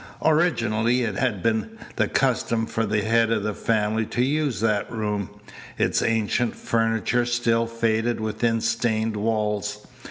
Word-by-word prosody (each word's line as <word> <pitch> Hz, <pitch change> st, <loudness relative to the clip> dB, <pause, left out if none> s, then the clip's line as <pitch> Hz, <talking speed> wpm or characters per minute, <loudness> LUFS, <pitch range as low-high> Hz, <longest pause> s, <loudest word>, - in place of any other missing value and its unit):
Originally 125 Hz, -7 st, +2 dB
it 110 Hz, -3 st, -1 dB
had 105 Hz, -5 st, -1 dB
been 115 Hz, -, -1 dB, 0.2 s
the -, -, +1 dB
custom 115 Hz, -3 st, +1 dB
for 115 Hz, 0 st, -2 dB
the 105 Hz, 0 st, 0 dB
head 115 Hz, +1 st, +2 dB
of 110 Hz, -3 st, +1 dB
the 105 Hz, 0 st, -1 dB
family 110 Hz, +1 st, 0 dB
to 120 Hz, +3 st, -1 dB
use 140 Hz, -4 st, 0 dB
that 105 Hz, -2 st, 0 dB
room. 105 Hz, -3 st, -2 dB, 0.5 s
Its -, -, +1 dB
ancient 115 Hz, +1 st, 0 dB
furniture 115 Hz, +1 st, 0 dB
still 120 Hz, -1 st, +1 dB
faded 115 Hz, 0 st, 0 dB
within 115 Hz, +1 st, 0 dB
stained 115 Hz, -1 st, 0 dB
walls. 105 Hz, -1 st, -2 dB
115 Hz, 140 wpm, -24 LUFS, 110-120 Hz, 0.5 s, Originally